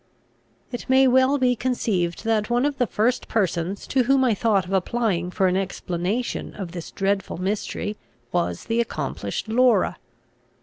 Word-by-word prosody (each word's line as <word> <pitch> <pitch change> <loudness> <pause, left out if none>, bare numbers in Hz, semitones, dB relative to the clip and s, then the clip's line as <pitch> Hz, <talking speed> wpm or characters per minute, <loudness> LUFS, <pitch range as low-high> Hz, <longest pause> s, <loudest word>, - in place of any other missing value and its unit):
It 245 - -6
may 265 0 +6
well 260 +2 +4
be 250 -2 +2
conceived, 210 -9 -1
that 220 -1 +1
one 240 +2 +2
of 290 -1 -1
the 245 - +2
first 230 +5 0
persons 190 -3 -1
to 255 -2 +1
whom 270 +1 +4
I 245 -3 +3
thought 205 -2 +2
of 185 - -6
applying 190 -2 0
for 190 +1 0
an 185 0 +2
explanation 190 +4 -2
of 190 -4 -6
this 170 -2 -7
dreadful 195 -2 -1
mystery 205 +2 -3 0.3
was 85 0 -1
the 230 +1 +1
accomplished 140 - -4
Laura. 245 +2 +3
215 Hz, 160 wpm, -24 LUFS, 185-245 Hz, 0.3 s, may